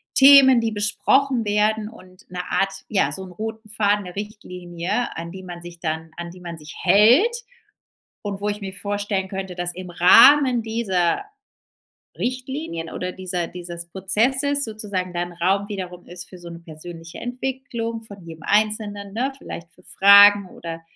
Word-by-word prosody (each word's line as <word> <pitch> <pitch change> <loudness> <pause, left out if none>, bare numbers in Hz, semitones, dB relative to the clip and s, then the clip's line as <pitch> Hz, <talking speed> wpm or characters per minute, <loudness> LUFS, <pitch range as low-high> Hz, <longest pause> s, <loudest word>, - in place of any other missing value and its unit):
Themen 270 -2 +8
die 225 -1 -1
besprochen 235 +5 +2
werden 210 +1 +1
und 185 -2 -17
'ne 180 - -5
Art 195 0 +1 0.2
ja 200 -2 +1
so 190 - -6
'n 185 - -12
roten 220 +4 -7
Faden 205 -1 +1
'ne 180 - -9
Richtlinie 180 0 -4
an 170 +1 -6
die 190 0 -9
man 175 -2 -9
sich 175 0 -11
dann 160 0 -4
an 170 0 -6
die 180 - -14
man 170 -2 -7
sich 150 -1 -11
hält 250 - +5 0.8
und 200 -2 -5
wo 205 - -2
ich 210 0 -3
mir 195 -1 -6
vorstellen 205 0 -2
könnte 190 -1 -5
dass 175 0 -3
im 180 0 -8
Rahmen 245 +8 +6
dieser 215 - 0 0.9
Richtlinien 255 - -4
oder 180 0 -4
dieser 180 -2 -4
dieses 170 -1 -8
Prozesses 255 +10 +1
sozusagen 200 -5 -4
dann 175 0 -3
Raum 190 +4 0
wiederum 180 -3 -7
ist 180 0 -8
für 185 - -12
so 175 -1 -10
'ne 170 0 -9
persönliche 165 0 -10
Entwicklung 245 -2 -4
von 200 -4 -12
jedem 160 -1 -11
Einzelnen, 205 -1 0
ne, 260 +5 -1
vielleicht 170 -9 -9
für 180 - -19
Fragen 200 +1 +7
oder 165 -1 -8
195 Hz, 165 wpm, -22 LUFS, 175-220 Hz, 0.9 s, Themen